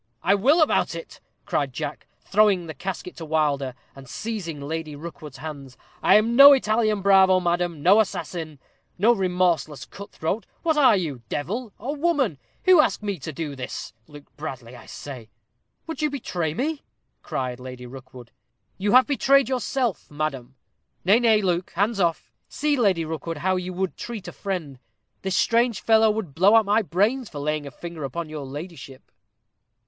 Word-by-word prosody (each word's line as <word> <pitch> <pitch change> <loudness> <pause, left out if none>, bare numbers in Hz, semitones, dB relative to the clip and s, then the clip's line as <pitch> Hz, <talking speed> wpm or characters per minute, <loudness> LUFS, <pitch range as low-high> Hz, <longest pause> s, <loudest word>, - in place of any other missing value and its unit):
"I 195 - +4
will 275 - +4
about 300 - +1
it," 165 - -9 0.2
cried 140 -3 -1
Jack, 150 +2 -5
throwing 200 -3 +3
the 160 - -7
casket 180 +4 -6
to 165 - -7
Wilder, 145 -4 0 0.2
and 135 -2 -13
seizing 195 - -5
Lady 155 +1 -5
Rookwood's 150 -3 -9
hands. 140 -3 -8 0.2
"I - - +5
am 225 +3 +3
no 280 +2 +11
Italian 215 -5 +1
bravo, 190 -1 +6
madam 175 -3 -1
no 195 +5 +6
assassin 165 -7 -3 0.4
no 220 +6 +5
remorseless 180 - 0
cut 200 0 -11
throat. 190 +8 -3 0.2
What 320 -2 +2
are 270 -7 +6
you 150 -9 -4
devil 210 - -3
or 280 +4 -4
woman 285 - 0 0.3
who 365 -4 +7
ask 260 - -1
me 200 -4 -3
to 160 - -6
do 150 -1 -5
this? 130 -2 -6
Luke 145 -1 -13
Bradley, 130 -5 -7
I - - -13
say." 125 -6 -9 0.6
"Would 325 -1 -6
you 305 - +2
betray 175 - -3
me?" 295 - -2 0.4
cried 125 -2 -4
Lady 125 -1 -9
Rookwood. 125 -1 -12 0.5
"You 205 +3 0
have 255 +1 +7
betrayed 275 -2 +3
yourself, 255 -3 -2
madam. 140 -4 -4 0.5
Nay, 205 +5 +5
nay, 220 -3 +3
Luke, 180 -1 -1
hands 205 +3 +1
off. 170 -3 0 0.2
See, 300 0 0
Lady 195 - +2
Rookwood, 160 +1 -5
how 185 +5 0
you 180 0 -3
would 190 0 -3
treat 230 -5 -7
a - - -6
friend. 170 -10 -5 0.4
This 190 0 -1
strange 235 -2 +2
fellow 220 -1 +4
would 210 -9 -3
blow 190 +8 +5
out 225 -1 +5
my 210 +3 +3
brains 210 - 0
for 150 - -9
laying 150 0 -2
a - - -5
finger 165 +3 -8
upon 155 +4 -4
your 150 -3 -6
ladyship." 145 -2 -9
180 Hz, 170 wpm, -24 LUFS, 150-220 Hz, 0.6 s, no